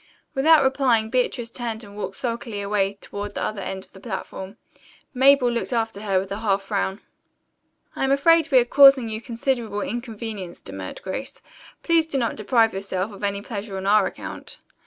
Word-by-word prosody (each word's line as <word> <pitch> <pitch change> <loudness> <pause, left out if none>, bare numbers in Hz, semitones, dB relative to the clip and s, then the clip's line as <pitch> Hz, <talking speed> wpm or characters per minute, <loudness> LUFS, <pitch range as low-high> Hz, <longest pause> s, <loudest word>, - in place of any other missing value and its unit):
Without 300 +2 +5
replying 255 -5 +2
Beatrice 245 -1 0
turned 235 -2 -4
and 200 -1 -12
walked 195 -2 -5
sulkily 230 -3 -4
away 200 -1 0
toward 205 0 -6
the - - -2
other 210 -2 -3
end 190 0 -5
of - - -26
the 190 - -13
platform. 190 +1 -6 0.6
Mabel 265 -1 +5
looked 235 +2 -2
after 225 -3 -1
her 195 -3 +1
with 190 +1 -6
a 200 - -3
half 200 -3 0
frown. 195 -1 -2 0.9
"I - - -2
am 270 - +2
afraid 320 +3 +4
we 265 - +6
are 245 - +5
causing 270 -2 +7
you 220 0 -4
considerable 235 -3 -2
inconvenience," 220 -5 -5
demurred 95 -1 -8
Grace. 230 +8 -5 0.4
"Please 330 -2 +3
do 290 - -2
not 235 -3 0
deprive 225 +1 +2
yourself 195 +1 -3
of 200 0 -11
any 200 0 -1
pleasure 205 -4 -5
on 190 - -5
our 205 0 +4
account." - - -8
220 Hz, 180 wpm, -23 LUFS, 200-255 Hz, 0.9 s, causing